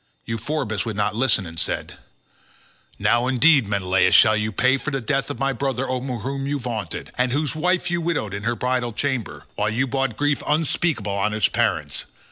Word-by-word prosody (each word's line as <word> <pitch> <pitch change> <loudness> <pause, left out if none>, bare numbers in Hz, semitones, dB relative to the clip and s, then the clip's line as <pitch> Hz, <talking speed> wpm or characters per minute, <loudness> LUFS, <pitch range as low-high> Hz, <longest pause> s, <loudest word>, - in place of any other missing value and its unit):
Euphorbus 115 -1 -2
would 110 -2 -4
not 105 +1 0
listen, 115 -5 +2
and 85 -1 -6
said, - - -2 1.0
"Now 120 +1 +2
indeed, 130 -1 +4
Menelaus, 95 -2 +2
shall 110 - +7
you 110 0 -1
pay 130 +5 +3
for 145 - -4
the 135 -2 -2
death 135 +4 -1
of 145 - -4
my 135 0 0
brother 135 +1 -2
over 130 0 -2
whom 135 +4 -4
you 145 +1 0
vaunted, 115 -9 -5
and 125 0 +2
whose 145 +1 0
wife 180 +2 0
you 175 0 0
widowed 160 - -1
in 100 - -4
her 120 +3 -1
bridal 125 0 -1
chamber, 130 -1 -3
while 105 +1 0
you 120 +5 0
brought 135 -3 -1
grief 145 0 +1
unspeakable 150 -7 0
on 100 +2 0
his 110 - +2
parents. - - -1
125 Hz, 190 wpm, -23 LUFS, 110-140 Hz, 1.0 s, shall